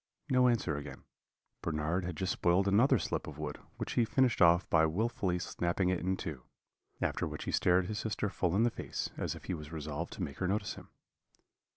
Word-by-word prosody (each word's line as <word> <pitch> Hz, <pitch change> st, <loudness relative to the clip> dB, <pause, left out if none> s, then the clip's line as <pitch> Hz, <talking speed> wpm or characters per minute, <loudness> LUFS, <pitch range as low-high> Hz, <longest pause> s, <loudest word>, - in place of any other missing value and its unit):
No 125 Hz, -1 st, +5 dB
answer 100 Hz, -11 st, +1 dB
again 75 Hz, +1 st, -8 dB, 0.6 s
Bernard 80 Hz, +3 st, -1 dB
had 90 Hz, -2 st, -4 dB
just 95 Hz, +2 st, 0 dB
spoiled 90 Hz, +3 st, +2 dB
another 120 Hz, +7 st, +5 dB
slip -, -, -2 dB
of 75 Hz, -2 st, -8 dB
wood, 75 Hz, -1 st, -5 dB, 0.2 s
which -, -, -4 dB
he 120 Hz, -, +3 dB
finished 125 Hz, 0 st, +2 dB
off 85 Hz, +1 st, +6 dB
by 80 Hz, -1 st, +4 dB
wilfully 95 Hz, 0 st, 0 dB
snapping 90 Hz, +1 st, 0 dB
it 90 Hz, -2 st, +1 dB
in 95 Hz, +1 st, -1 dB
two; 75 Hz, -9 st, -5 dB, 0.6 s
after -, -, 0 dB
which -, -, -6 dB
he -, -, -3 dB
stared 90 Hz, +1 st, +3 dB
his 105 Hz, +3 st, -3 dB
sister 105 Hz, -1 st, -1 dB
full 90 Hz, -2 st, 0 dB
in 110 Hz, -, +4 dB
the 120 Hz, -, +3 dB
face, -, -, -4 dB
as -, -, -2 dB
if -, -, -11 dB
he 95 Hz, -, -3 dB
was 75 Hz, -2 st, -7 dB
resolved 80 Hz, +1 st, -4 dB
to -, -, -4 dB
make 70 Hz, -, -6 dB
her 90 Hz, -, 0 dB
notice 100 Hz, +3 st, -1 dB
him. -, -, -12 dB
90 Hz, 210 wpm, -32 LUFS, 80-105 Hz, 0.6 s, off